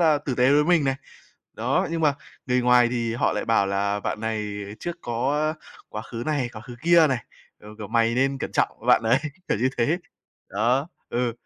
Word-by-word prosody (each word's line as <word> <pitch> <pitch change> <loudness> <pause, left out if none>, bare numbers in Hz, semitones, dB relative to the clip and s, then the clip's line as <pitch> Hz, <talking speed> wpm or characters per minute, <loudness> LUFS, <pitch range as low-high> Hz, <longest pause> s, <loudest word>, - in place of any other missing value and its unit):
là 155 -3 +4
tử 145 -3 -3
tế 125 +2 +4
với 150 +1 +4
mình 170 -3 +3
này. 135 -1 +1 0.6
Đó, - - 0
nhưng 165 0 -2
mà 150 -3 +3 0.3
người 125 0 +2
ngoài 125 -1 +5
thì 115 -2 -1
họ - - +1
lại 105 - -2
bảo 115 -3 +2
là 100 +1 0
bạn 105 - -3
này 110 -1 -2 0.3
trước 175 0 -5
có 140 +6 0 0.3
quá 110 - -6
khứ 115 0 -7
này, 145 -5 0
quá 110 - -8
khứ 120 - -10
kia 170 -1 +6
này, 130 -5 -1 0.4
ờ, 105 - -13
kiểu: 105 -2 -7
"Mày 115 0 +2
nên 135 +2 +1
cẩn - - -5
trọng - - +2
với - - -12
bạn - - +5
đấy", 115 +3 +3 0.3
kiểu - - +1
như 125 +4 +2
thế. 150 +9 +2 0.5
Đó, 120 - +1 0.2
ừ. 120 0 -1
125 Hz, 215 wpm, -24 LUFS, 115-145 Hz, 0.6 s, kia